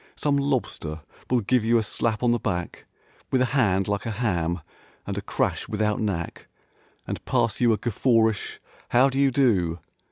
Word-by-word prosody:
Some 145 -1 +1
lobster 120 - -2 0.3
will 125 -2 +2
give 120 +3 +2
you 115 +1 +3
a 115 - +1
slap 110 +2 -1
on 120 - +4
the 120 - +1
back 90 -6 -4 0.4
With 130 - +3
a 130 - +4
hand 100 -8 +2
like 100 +2 -2
a 110 -3 -4
ham 85 -7 0 0.4
and - - -4
a - - -3
crash - - -1
without 105 -1 0
knack 95 -6 -3 0.6
And - - -5
pass 115 - 0
you 120 -2 +5
a 110 - +2
guffawish 115 -2 +1 0.3
"How 130 +3 +5
do 135 +1 -2
you 140 -1 +5
do?" 105 -11 +2
110 Hz, 180 wpm, -25 LUFS, 100-125 Hz, 0.6 s, you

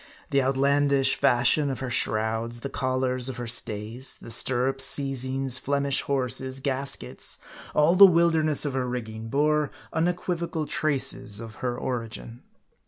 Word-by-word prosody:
The 140 - +2
outlandish 135 0 +2
fashion 135 +2 +3
of 135 - -4
her 130 -2 -5
shrouds, 115 +2 -1
the 140 - -6
collars 130 -1 0
of 130 - -7
her 120 - -5
stays, 115 +2 0
the - - -5
stirrups, 130 +3 +2
seizings, 135 -1 +1
Flemish 140 0 +1
horses, 130 -1 -1
gaskets, 135 0 0 0.4
all 150 +3 +4
the 195 +2 +9
wilderness 160 -4 +2
of 145 - -3
her 130 -1 -2
rigging, 110 -2 -6
bore 150 +2 +1 0.2
unequivocal 170 -1 -2
traces 130 -8 -1
of 115 -2 -10
her 125 -1 -3
origin. 115 -1 -6
130 Hz, 135 wpm, -25 LUFS, 120-140 Hz, 0.4 s, the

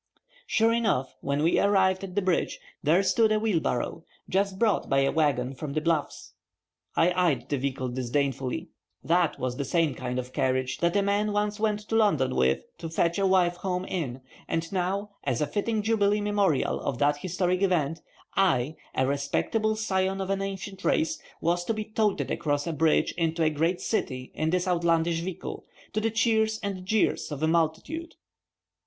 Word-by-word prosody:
Sure 225 +1 +3
enough, 215 - 0
when 140 +2 0
we 165 - +3
arrived 190 -2 +3
at 190 -1 -7
the 205 - +1
bridge, 185 -2 0 0.2
there 165 +6 +3
stood 220 +2 +3
a 215 - +3
wheelbarrow, 165 - -1 0.2
just 195 0 0
brought 215 -2 +1
by 135 0 +3
a 135 - +2
wagon 135 -5 +1
from 140 +1 -6
the 155 - +1
Bluffs. 150 - -1 0.6
I 170 +2 +4
eyed 175 -7 +1
the 145 - 0
vehicle 130 -1 -2
disdainfully. 130 +1 -2 0.3
That 170 0 +2
was 125 -1 -2
the 140 - -1
same 160 0 +1
kind 125 0 -4
of 125 0 -5
carriage 130 0 0
that 170 +1 +1
a 200 - +3
man 205 +1 +1
once 210 0 0
went 210 -1 0
to 215 +1 -4
London 155 -13 +3
with 65 +1 +2 0.2
to 165 - -5
fetch 170 +2 +1
a 195 - +3
wife 180 -2 +3
home 180 0 -2
in, 135 -10 -3 0.3
and 165 0 -2
now, 195 +2 -1
as 130 -4 0
a 150 - +2
fitting 210 +7 -1
jubilee 210 -1 +2
memorial 205 -7 +1
of 130 - -3
that 145 +1 +2
historic 180 +2 -1
event, 165 -5 +1 0.3
I, 160 -6 +2 0.2
a 130 - +2
respectable 145 +11 0
scion 195 -3 0
of 190 0 -2
an 195 0 0
ancient 195 0 -5
race, 315 -1 +1 0.2
was 175 +1 +1
to 225 - -1
be 215 0 -3
toted 215 -2 0
across 145 -1 -1
a 170 - -2
bridge 160 +1 +2
into 165 0 +1
a 155 - +3
great 165 +4 0
city 130 - -2
in 155 - -1
this 180 +2 0
outlandish 170 -1 +2
vehicle, 175 +1 -5 0.3
to 215 - 0
the 225 - +1
cheers 220 -1 +2
and 190 -2 -4
jeers 215 -6 +1
of 145 +1 -4
a - - +4
multitude. 170 - -1
175 Hz, 185 wpm, -27 LUFS, 145-200 Hz, 0.6 s, I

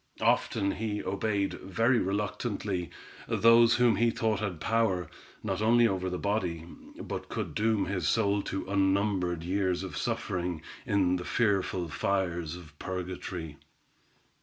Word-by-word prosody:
Often 100 0 +2
he 105 -2 -2
obeyed 100 0 -1
very 115 +6 +2
reluctantly, 100 -2 -2 0.4
those 115 +1 +6
whom 120 -2 +4
he 120 0 +4
thought 110 -2 0
had 100 -6 -3
power, 110 -2 +1 0.4
not - - -2
only 120 +2 +5
over 95 -3 -1
the 90 - -3
body, 90 -6 -1 0.3
but - - -5
could - - -4
doom 110 -2 +1
his 90 -6 -1
soul 100 0 +2
to 95 -1 -4
unnumbered 95 -3 +1
years 95 0 0
of 95 - -6
suffering, 90 -3 -2 0.2
in 95 -3 +2
the 90 - -5
fearful 95 -6 +1
fires 85 -1 -1
of 85 -5 -12
purgatory. 90 -4 -5
95 Hz, 135 wpm, -29 LUFS, 90-110 Hz, 0.4 s, those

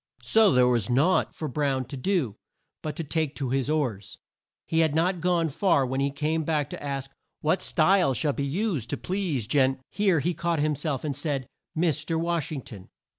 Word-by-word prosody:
So 220 -2 +5
there 125 -1 +5
was 120 -3 +1
naught 145 +10 +2
for 155 - -4
Brown 135 -2 0
to 140 - -7
do 135 - 0 0.5
but 155 -2 -4
to 165 - -3
take 155 -1 -2
to 135 -4 -3
his 135 +1 0
oars. 120 -11 -2 0.5
He 165 - 0
had 160 -2 +2
not 175 +2 +1
gone 175 -2 +2
far 145 -2 +2
when 130 +1 -2
he 140 +1 +1
came 155 +3 -1
back 150 -2 -1
to - - -7
ask 135 -1 -4 0.3
"What 160 +5 +1
style 175 -4 +3
should 145 0 0
be 140 - 0
used 150 - -1
to - - -2
please 180 - -2
Gen 130 +2 +2
(here 195 -6 +2
he 175 +5 0
caught 170 0 -1
him 150 +1 +1
self 145 -1 -2
and 145 -3 -2
said) 140 -5 -1 0.3
Mis 160 -3 +1
ter 165 - -1
Wash 170 -2 -1
ing 140 -5 -4
ton." 95 -4 -11
150 Hz, 205 wpm, -26 LUFS, 135-165 Hz, 0.5 s, So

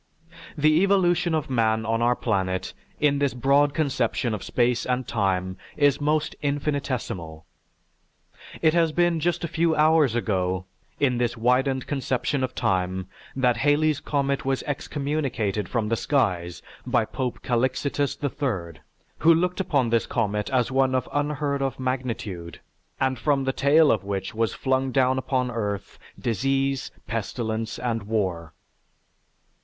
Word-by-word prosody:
The 155 +2 +4
evolution 180 -3 +3
of 155 - -1
man 110 -3 +1
on 115 +1 0
our 120 +1 +3
planet 95 -6 -1 0.3
in 145 -1 +2
this 140 -2 0
broad 140 +3 +3
conception 130 -5 0
of 105 - -4
space 120 0 +1
and 125 0 -1
time 95 -3 -1 0.2
is 145 -1 +3
most 150 +1 0
infinitesimal. 130 - -3 1.2
It 160 -1 +5
has 165 -2 +3
been 175 0 +2
just 175 +2 0
a - - 0
few 165 0 +1
hours 155 -5 +4
ago 95 -5 -1 0.3
in 125 -4 +2
this 120 -1 0
widened 130 +3 +1
conception 135 0 -1
of 130 0 -3
time 95 0 -1 0.3
that 125 -3 +2
Halley's 150 +3 +2
comet 140 -1 -1
was 135 0 -1
excommunicated 140 -8 -2
from 115 -3 -1
the 115 - +2
skies 95 - 0 0.2
by - - +1
Pope 125 -3 -4
Calixitus 130 +3 0
III, 110 - -3 0.4
who 165 - +6
looked 180 +3 0
upon 140 -10 +1
this 115 -1 +2
comet 105 -5 -1
as 130 -1 +1
one 130 0 +2
of 130 - 0
unheard 145 -1 -1
of 135 -1 -2
magnitude 120 -9 -4 0.4
and 130 -2 0
from 140 +1 +1
the 135 0 0
tail 150 +3 +5
of 110 - 0
which 95 -1 -3
was 115 0 -1
flung 130 0 0
down 130 0 +2
upon 130 -1 -1
the - - -6
earth, 100 -3 -4 0.2
disease, 135 +3 0 0.2
pestilence, 115 0 -3
and 115 -2 -2
war. 95 -7 -2
130 Hz, 145 wpm, -25 LUFS, 110-145 Hz, 1.2 s, who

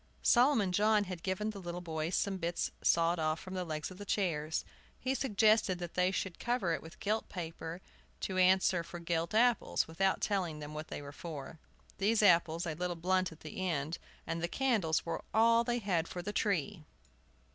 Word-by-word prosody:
Solomon 240 -6 +4
John 210 +2 +3
had 180 -3 -6
given 195 +4 -1
the 200 - -8
little 175 0 -5
boys 165 0 -2
some 200 - +1
of 190 - -6
the 165 - 0
bits 175 - -1
sawed 170 +1 +3
off 155 0 0
from 185 - -8
the 185 -1 -2
legs 155 0 -4
of 185 - -11
the - - -5
chairs. 160 -6 -1 0.3
He 260 - -1
had 265 - -1
suggested 215 -5 +3
that 175 -1 -6
they 180 0 +3
should 190 -2 -3
cover 235 -8 0
them - - -2
with 160 +1 -12
gilt 215 +2 -1
paper, 165 0 -6 0.4
to 185 -1 -1
answer 185 -1 +4
for 175 - -8
gilt 170 +2 -2
apples, 240 +1 +3
without 190 +4 +1
telling 185 -7 -1
them 150 0 -7
what 155 +1 -6
they - - -6
were 140 - -8
for. 155 -1 -8 0.4
These 215 +2 +3
apples, 170 -2 +4
a 160 - -2
little 175 +2 -2
blunt 185 +2 +1
at 160 - -14
the 155 +4 -6
end, 155 +1 -2 0.3
and 165 0 -3
the 170 - 0
candles 210 -9 +1
were 165 - -3
all 230 +1 +5
they 240 0 0
had 180 -7 0
for 175 - -6
the 205 +3 -4
tree! 200 -4 0
180 Hz, 205 wpm, -33 LUFS, 165-205 Hz, 0.4 s, all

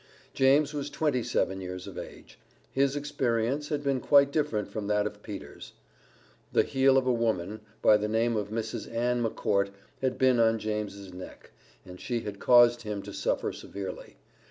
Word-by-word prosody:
James 140 +3 +3
was 145 -1 -3
twenty 145 -3 0
seven 95 -3 -1
years 90 0 -6
of - - -9
age. - - -10 0.3
His 135 +1 +1
experience 135 -1 -1
had 145 -1 -2
been 135 -2 +1
quite 140 +1 +5
different 145 -9 0
from 105 -2 -5
that 105 0 +1
of 105 0 -5
Peter's. 95 -10 -9 0.8
The - - +4
heel 135 0 +3
of 130 - +2
a 130 - +3
woman, 110 -4 -1 0.2
by 105 - +7
the 105 0 -2
name 115 +2 +1
of 105 -2 -2
Mrs. 110 +1 -4
Ann 120 +1 0
McCourt, 100 -3 0 0.3
had 130 -1 0
been 130 -2 +4
on 115 0 +4
James's 105 -3 -4
neck, 90 0 -11 0.3
and 90 0 -11
she 120 -3 -2
had 100 -2 -7
caused 120 -1 +6
him 105 -3 -5
to - - -9
suffer - - -1
severely. 100 -1 -8
115 Hz, 175 wpm, -28 LUFS, 105-135 Hz, 0.8 s, by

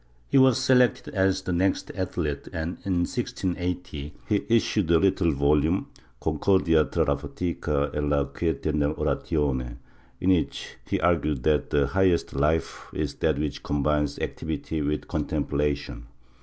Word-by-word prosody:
He - - +5
was 130 -3 +5
selected 125 -3 +3
as 95 0 +1
the 90 - -2
next 95 +3 0
athlete 85 -6 -3
and, 80 +2 -4
in 90 -3 0
1680, 90 - -4
he 105 -2 +1
issued 110 -5 +2
a 85 - +6
little 95 -1 +2
volume 75 +5 +2 0.2
— - - -34
"Concordia 80 -5 +3
tra - - 0
la - - +1
fatica 75 -5 -2
e - - -2
la 75 -1 +2
quiete 80 -1 -2
nell' 75 0 +1
oratione," 65 -5 -1 0.4
in 95 - +2
which 90 -3 -1
he - - 0
argued 75 -6 +1
that 75 -3 +2
the 70 -1 +2
highest 95 +3 +1
life 75 +4 0
is - - -2
that 80 -3 0
which 75 0 -3
coml)ines 75 0 0
activity 80 0 -3
with 75 +1 -2
contemplation. 70 -4 -2
80 Hz, 145 wpm, -26 LUFS, 75-95 Hz, 0.4 s, a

